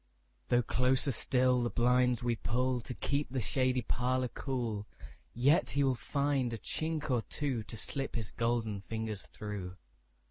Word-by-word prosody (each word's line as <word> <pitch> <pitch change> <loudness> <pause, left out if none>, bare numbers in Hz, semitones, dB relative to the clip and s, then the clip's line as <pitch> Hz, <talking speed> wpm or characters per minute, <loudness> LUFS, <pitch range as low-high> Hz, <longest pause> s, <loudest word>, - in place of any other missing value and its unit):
Though 120 0 +4
closer 130 +4 +2
still 125 +1 +3
the 120 - 0
blinds 125 +2 +3
we 120 -1 +1
pullTo 125 +2 -1
keep 145 +1 0
the 130 +1 -2
shady 130 0 +1
parlour 125 +2 0
cool, 115 -7 -3 0.4
Yet 140 +9 +3
he 140 - +1
will 135 -1 +3
find 140 -1 0
a - - -2
chink 155 +5 -2
or 120 -2 +3
twoTo 115 -6 -3
slip 135 +6 -4
his 110 -3 -3
golden 115 -3 0
fingers 110 +1 -4
through. 100 -4 -6
125 Hz, 145 wpm, -33 LUFS, 115-130 Hz, 0.4 s, Though